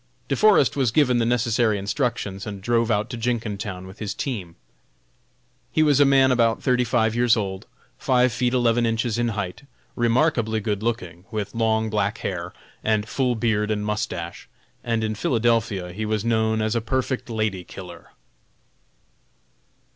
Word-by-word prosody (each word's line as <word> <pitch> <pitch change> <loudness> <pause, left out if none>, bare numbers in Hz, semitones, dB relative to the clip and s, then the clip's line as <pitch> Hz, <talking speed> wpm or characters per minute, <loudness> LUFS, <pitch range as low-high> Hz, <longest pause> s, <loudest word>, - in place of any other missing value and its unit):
De - - +1
Forest 210 -9 +4
was 135 -4 +2
given 125 -1 +3
the 115 - +1
necessary 115 -2 +2
instructions, 100 -2 -2
and 100 -1 -5
drove 115 0 +1
out 105 0 +1
to - - -4
Jenkintown 105 -5 -3
with 95 +3 -12
his 105 -2 -4
team. 95 -11 -4 1.2
He 155 - +3
was 145 -2 +4
a 145 - +7
man 135 -1 +5
about 115 -2 +2
thirty 125 -1 +2
five 110 -2 +1
years 120 -1 +3
old, 95 -1 -4 0.3
five 125 -3 +2
feet 125 +1 0
eleven 120 -1 +2
inches 115 0 -1
in 120 - +1
height, 100 -3 -4 0.3
remarkably 120 -2 +2
good 105 -1 -2
looking, 100 -7 -3
with 105 -2 -4
long 110 -1 +1
black 105 +1 0
hair, 90 -2 -4 0.3
and 110 -1 +1
full 125 0 0
beard 110 -2 0
and 105 -1 -1
mustache, 90 -5 -4 0.3
and 115 -2 -1
in 110 0 -1
Philadelphia 110 -5 0
he 105 +3 -3
was 110 0 -1
known 110 -1 +1
as 110 +2 0
a 115 - +1
perfect 130 +2 -2
"lady 110 -5 -1
killer." 90 -1 -11
110 Hz, 160 wpm, -23 LUFS, 105-120 Hz, 1.2 s, a